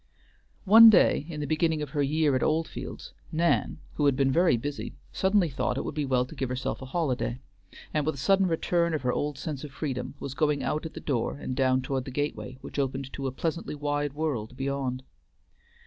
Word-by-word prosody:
One 225 +3 +10
day 180 -7 +4
in 150 -3 -5
the - - -1
beginning 155 +1 +1
of 145 - -7
her 145 - 0
year 145 0 +2
at 130 - +1
Oldfields, 160 +1 -2 0.2
Nan, 170 +2 +1 0.2
who 145 - +1
had 140 - +3
been 135 0 +2
very 170 -3 +4
busy, 145 +5 -5 0.2
suddenly 190 -1 +3
thought 125 -1 -1
it - - -1
would - - -4
be 150 0 -1
well 125 -1 +2
to 130 - -12
give 135 -4 -3
herself 130 +2 -3
a 130 - -7
holiday; 130 -5 -1 0.5
and 150 - +1
with 155 +1 -1
a - - -11
sudden 195 +8 +3
return 170 0 +1
of 150 - -4
her 125 -1 +1
old 145 -1 -2
sense 145 -1 -5
of 150 - -6
freedom 140 -2 -4
was 135 - -5
going 150 -1 +1
out 155 +2 -1
at - - -15
the - - -5
door 130 -2 -1
and 130 - -4
down 130 -1 +2
toward 135 -1 -2
the - - -6
gateway, 145 -1 -3
which - - -6
opened 135 0 -2
to 135 -1 -3
a - - -2
pleasantly 165 +3 -3
wide 145 -1 -1
world 130 -6 -3
beyond. 135 -2 -2
145 Hz, 215 wpm, -27 LUFS, 130-155 Hz, 0.5 s, One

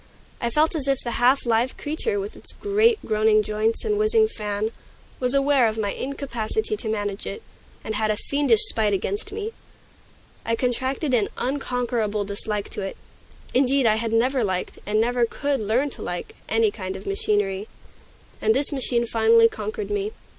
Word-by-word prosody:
I 235 - +1
felt 305 +7 +2
as 295 -4 -3
if 275 -1 +3
the 235 - -2
half 255 +3 +4
live 235 +2 +1
creature, 360 +8 -2
with 410 +2 -5
its - - -10
great, 425 +3 +3
groaning 215 0 +3
joints 215 - 0
and 420 -1 +1
whizzing 435 +1 +4
fan, 210 - -3 0.5
was 250 +1 +1
aware 275 -3 +4
of 220 0 -2
my 205 -2 0
incapacity 280 - -3
to 235 - -4
manage 205 -2 -3
it, 450 - -6 0.4
and 220 - -3
had 215 0 0
a 210 - +1
fiendish 280 -4 +2
spite 215 -2 +3
against 195 - -2
me. 435 +1 -4 0.9
I 230 - 0
contracted 260 +4 -1
an 220 -4 +2
unconquerable 245 -6 -1
dislike 205 +1 -3
to - - -5
it; 195 0 -5 0.6
indeed, 265 +1 +3
I 215 -1 +4
had 225 0 -2
never 250 +3 +2
liked, 185 -3 -2
and 215 +1 +2
never 240 +2 +2
could 280 +4 0
learn 240 +7 +1
to - - -8
like, 175 0 -4 0.2
any 225 -1 +3
kind 190 -3 -5
of 190 - -8
machinery. 195 0 0 0.7
And 440 - +3
this 285 - +1
machine 245 -4 +1
finally 455 - +5
conquered 435 -1 -5
me. 415 +1 -1
240 Hz, 175 wpm, -24 LUFS, 215-285 Hz, 0.9 s, finally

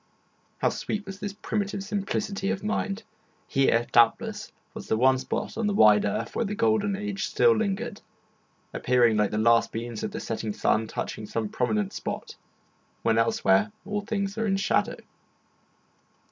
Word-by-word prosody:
How - - +2
sweet 210 0 -4
was 195 0 -8
this 205 -1 -4
primitive 200 -2 -2
simplicity 200 -1 -2
of 190 - -2
mind! 215 0 -2 0.4
Here, 135 -4 +2
doubtless, 120 -1 +2 0.2
was - - -8
the 110 - +1
one 130 +2 +4
spot 180 - -4
on 225 - +1
the 205 - 0
wide 105 - +6
earth 110 +3 -2
where - - +1
the 210 -1 -3
golden 220 -3 +2
age 205 0 -3
still 235 -1 +4
lingered, 220 +1 -2 0.7
appearing 120 -3 +3
like 105 -1 +2
the 105 - -3
last 115 +1 +4
beams 115 -1 -5
of - - -2
the - - -6
setting 110 -2 -3
sun 110 +2 +1
touching 110 0 -5
some 110 0 -2
prominent 105 -5 -1
spot, - - -5 0.7
when 115 0 +3
elsewhere 105 -3 +3
all 205 +1 -2
things 200 -1 -3
are 225 - 0
in 195 -1 +1
shadow. 195 - +1
195 Hz, 160 wpm, -26 LUFS, -, 0.7 s, wide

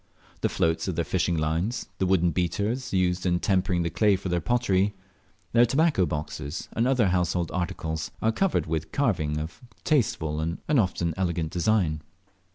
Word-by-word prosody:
The - - +1
floats 80 +3 0
of 95 - -2
their 85 0 0
fishing 90 -2 0
lines, 80 +10 -1
the 95 - +1
wooden 90 -2 +3
beaters 105 - -1
used 90 -1 +1
in 90 -1 +1
tempering 90 -2 +1
the 85 - -2
clay 105 +3 +3
for 95 0 -4
their 85 0 0
pottery, 105 -3 +1 0.6
their 120 0 +6
tobacco 135 - +2
boxes, 75 0 -4
and 115 +2 +1
other 125 -7 +3
household 90 -1 0
articles, 80 -3 -3
are 110 - +2
covered 195 - +1
with 80 0 -3
carving 85 - 0
of 80 +2 -6 0.2
tasteful 80 - +1
and 80 +2 -2
often 95 - +1
elegant 85 -4 -1
design. 90 -5 +1
90 Hz, 165 wpm, -26 LUFS, 80-105 Hz, 0.6 s, their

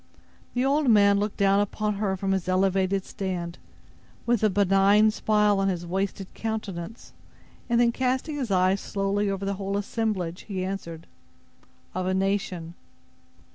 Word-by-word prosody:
The 250 +1 +1
old 285 0 +2
man 200 -2 +5
looked 210 0 -2
down 200 0 +3
upon 210 0 -1
her 195 -2 -1
from 195 +1 -1
his 190 -1 -1
elevated 190 +1 +1
stand, 180 -4 -4 0.7
with 240 -2 +2
a 215 - +4
benignant 200 +2 +4
smile 210 -2 +2
on 195 - +1
his 175 -2 -2
wasted 195 +1 -3
countenance, 215 -2 -5 0.6
and 235 0 +3
then 240 -1 +4
casting 260 +5 -1
his 260 -5 -3
eyes 185 +1 +2
slowly 200 +1 -1
over 195 0 -3
the 200 - -1
whole 195 +1 -1
assemblage, 200 -5 -2
he 190 -3 -3
answered: 170 -4 -6 0.9
"Of 185 0 -2
a 185 - +1
nation." 190 -3 -1
195 Hz, 150 wpm, -26 LUFS, 185-210 Hz, 0.9 s, man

